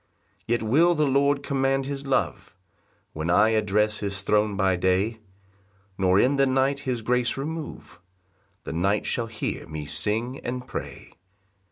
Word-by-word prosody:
3 120 - +1
Yet 120 - -3
will 160 +10 +4
the 150 -1 +2
Lord 140 +1 +2
command 135 -1 0
his 140 0 -5
love, 135 - -1 0.6
When 80 +2 -3
I 105 +5 +5
address 105 -1 +1
his 100 -1 -3
throne 105 0 +1
by 95 -2 +2
day, 95 +5 +1 0.8
Nor 95 0 +3
in 135 +5 +3
the 135 0 +4
night 135 +1 +1
his 125 -5 -3
grace 125 +1 +1
remove; 150 - -6 0.6
The - - -5
night 100 +5 +1
shall 115 -1 -1
hear 110 -1 -4
me 75 -1 -6
sing 105 - -1
and 125 +1 -5
pray. - - -7
115 Hz, 155 wpm, -25 LUFS, 100-135 Hz, 0.8 s, I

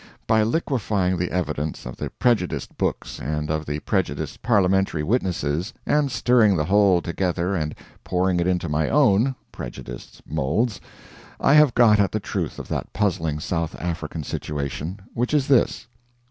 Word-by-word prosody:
By 110 -1 +3
liquifying 110 - 0
the 90 +1 -1
evidence 80 -4 -3
of 60 - -6
the - - -4
prejudiced 115 -8 0
books - - -2
and 75 +1 -2
of 80 -1 -2
the 75 +1 -2
prejudiced - - -2
parliamentary 95 -7 +2
witnesses 90 - -1
and 145 -2 +2
stirring 115 -5 +4
the 75 - 0
whole 95 -2 +4
together 90 +1 -1
and 75 -4 -2 0.3
pouring 90 0 +1
it 85 - +1
into 90 -2 0
my 75 +1 0
own 130 -2 +3 0.2
(prejudiced) - - -9
moulds, 90 - -1 0.6
I - - +4
have 150 -5 +6
got 115 -4 +6
at 100 -2 +3
the 110 - 0
truth 100 - -3
of - - -7
that - - -3
puzzling 80 -7 0
South 80 0 -2
African 80 -2 -4
situation, 75 +7 -4
which 125 +5 0
is 140 -3 +2
this: 135 -4 +2
1. 120 0 -37
95 Hz, 160 wpm, -23 LUFS, 80-110 Hz, 0.6 s, have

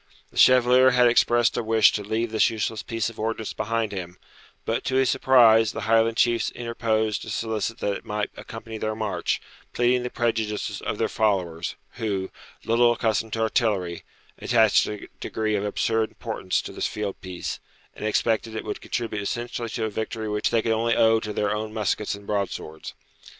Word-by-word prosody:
The - - -14
Chevalier 130 0 +6
had 125 0 +5
expressed 120 -1 +3
a - - +1
wish 110 -1 +5
to 105 - -3
leave 110 +2 -2
this 110 +1 +3
useless 110 -1 -3
piece 115 -2 -2
of 115 - -16
ordnance 110 0 -3
behind 115 -1 -1
him; 90 -3 -6 0.5
but, 115 - -1
to 130 - -1
his 130 -1 +3
surprise, 115 -4 +5
the - - -5
Highland 115 +1 +2
chiefs 120 -1 +2
interposed 110 -3 -1
to - - -8
solicit 110 0 -2
that 100 -1 0
it - - -15
might 105 0 -3
accompany 115 -1 -8
their 110 0 -2
march, 110 0 -1 0.3
pleading 125 +1 +2
the 125 - -3
prejudices 110 -3 -2
of - - -3
their - - +1
followers, 90 -6 -1 0.2
who, 100 -4 -2 0.3
little 120 +1 +4
accustomed 110 -1 -1
to 115 - -1
artillery, 105 -7 0 0.4
attached 110 -3 +4
a 105 -1 -6
degree 110 -1 -2
of 100 - -1
absurd 110 +2 0
importance 110 -5 -3
to - - -7
this - - -2
field 105 -2 -5
piece, 90 -2 -5 0.4
and - - -9
expected 110 +1 0
it 110 - -4
would 105 - -5
contribute 115 -4 -3
essentially 120 +2 -3
to 110 +1 -2
a - - -1
victory 110 +1 -4
which 105 0 0
they 115 -2 +1
could 115 - 0
only 115 +1 +1
owe 110 0 +4
to 105 -1 -5
their 105 0 0
own 110 0 -4
muskets 105 -1 -1
and 100 0 -13
broadswords. 100 -6 -4
110 Hz, 185 wpm, -25 LUFS, 105-115 Hz, 0.5 s, Chevalier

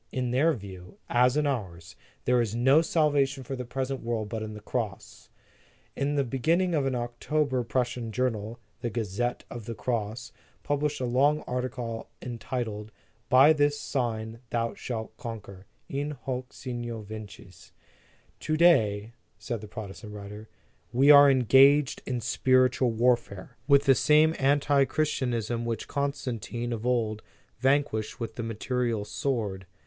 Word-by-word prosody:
In 125 -2 -2
their 150 +6 +3
view, 95 -6 -10
as 125 +3 +4
in 150 - +2
ours, 95 - -4 0.3
there 125 0 +3
is 115 -2 -2
no 135 +6 +5
salvation 145 -4 +1
for 135 +2 -5
the 125 -1 -5
present 130 +1 -3
world 115 -2 -3
but 110 -1 -4
in 110 0 -6
the - - -8
Cross. 105 -1 -5 0.7
In 140 +1 -1
the 140 - +2
beginning 165 +8 +1
of 145 -4 +1
October 130 +3 -1
a - - -1
Prussian 120 -1 -2
journal, 115 -2 -2 0.2
the 120 - -2
Gazette 115 +2 -2
of 120 -3 -7
the 115 - -5
Cross, 115 0 -3 0.3
published 145 -1 -1
a - - 0
long 140 +5 +2
article 125 -2 -4
entitled: 115 -3 -5 0.4
By 135 +5 +7
this 145 -1 +1
sign 115 -4 -3
thou 115 -1 -1
shall 110 -3 -5
conquer: 100 -4 -8 0.2
In 145 +1 -3
hoc 130 0 -4
signo 120 -3 -5
vinces. 100 -4 -11 0.7
"To 155 0 -1
day," 115 -10 +3 0.2
said 120 -4 -5
the 105 - -9
Protestant 105 0 -8
writer, 105 +1 -9 0.4
"we 135 +4 +6
are 145 -1 +9
engaged 135 +2 +5
in 125 -2 -2
spiritual 130 +2 +3
warfare 115 -4 0
with 140 -1 +5
the 135 - +7
same 155 +4 +4
antichristianism 135 -4 +1
which 115 -1 -3
Constantine, 130 -4 -3
of 115 +1 -4
old, 110 -3 0 0.4
vanquished 130 -5 +1
with 115 -1 -4
the 120 - -5
material 115 -1 -2
sword. 105 -4 -3
120 Hz, 145 wpm, -27 LUFS, 110-135 Hz, 0.7 s, are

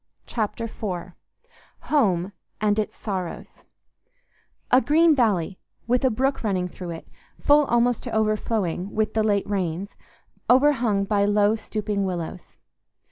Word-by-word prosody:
Chapter 225 0 -3
IV 190 -5 -5 0.8
Home 195 - +2 0.3
and 210 0 +1
Its 215 - -2
Sorrows 190 -5 -5 1.2
A 255 - +6
green 320 +2 +4
valley 195 - +1 0.3
with 250 +2 +1
a 260 - +4
brook 265 +4 -1
running 185 -4 0
through 180 0 -8
it, 165 -1 -7 0.3
full 290 0 +4
almost 240 -1 +2
to 245 - -5
overflowing 215 -4 -1
with 215 -1 0
the 220 - +1
late 205 -2 +1
rains, 190 -1 -2 0.6
overhung 250 -6 +4
by 200 0 +2
low 205 +1 +3
stooping 210 -2 -3
willows. 180 -1 -4
210 Hz, 130 wpm, -24 LUFS, 190-235 Hz, 1.2 s, A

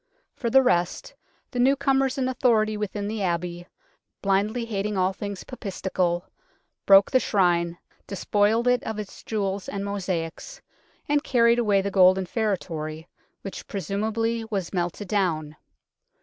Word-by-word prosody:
For 235 - -2
the 265 +3 +6
rest, 175 -7 0 0.4
the 245 - -3
newcomers 270 +1 +2
in 260 -1 0
authority 230 -4 +2
within 205 -1 -3
the 215 0 -3
Abbey, 175 -1 -2 0.6
blindly 205 +4 +1
hating 210 -2 -2
all 185 +1 +2
things 200 -1 -6
papistical, 185 -6 -2 0.6
broke 195 0 +7
the 260 - +5
Shrine, 175 -6 +1 0.3
despoiled 210 +4 +1
it 245 0 +3
of 220 -1 -4
its 210 -2 -8
jewels 200 -3 -2
and 200 0 -4
mosaics, 190 - -4 0.5
and 290 0 +2
carried 235 -3 +3
away 205 -4 +2
the 200 - -2
golden 185 0 +5
feretory, 165 -7 -3 0.4
which 195 - -7
presumably 220 +4 -2
was 195 -5 -3
melted 175 +2 -2
down. 160 -7 -1
200 Hz, 135 wpm, -25 LUFS, 185-230 Hz, 0.6 s, broke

